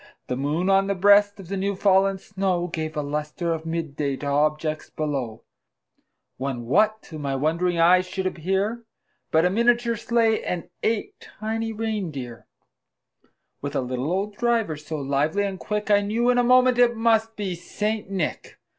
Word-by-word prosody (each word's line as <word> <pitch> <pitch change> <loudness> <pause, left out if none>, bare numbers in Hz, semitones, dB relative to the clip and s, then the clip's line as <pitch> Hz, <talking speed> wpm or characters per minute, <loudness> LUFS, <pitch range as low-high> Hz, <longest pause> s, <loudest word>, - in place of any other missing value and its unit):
The 125 - -3
moon, 150 +7 -1
on 195 0 +4
the 200 - 0
breast 205 +2 +5
of 190 - -10
the 195 +2 -3
new 200 +1 -1
fallen 195 0 +3
snow, 190 -2 -1
Gave 155 -2 -4
a 150 - 0
lustre 150 +4 -2
of 160 0 -6
mid 160 -3 -3
day 140 -2 -1
to 145 - -7
objects 155 +2 0
below; 135 -8 -3 0.9
When, 130 -2 -4
what 215 - +2
to 155 - -9
my 140 -2 -2
wondering 170 +5 0
eyes 180 +2 +5
should 190 +1 -4
appear, 195 +6 -1 0.5
But 160 +2 +3
a 180 - +3
miniature 235 +2 +2
sleigh, 230 -1 +1
and 175 0 -4
eight 220 -1 -1 0.2
tiny 225 +1 -2
rein 215 -4 -2
deer, 125 -5 -8 1.1
With 145 +1 -5
a - - +1
little 130 +4 -3
old 200 +3 -2
driver, 230 -8 +1
so 150 +1 -6
lively 145 +7 0
and 195 -2 -4
quick, 210 0 -2
I 205 0 +5
knew 230 +4 +1
in 245 - +2
a - - +4
moment 250 0 +4
it 240 -1 +5
must 225 0 +2
be 200 -3 -3
St. 210 +4 -3
Nick. 190 -5 -3
185 Hz, 175 wpm, -24 LUFS, 155-215 Hz, 1.1 s, breast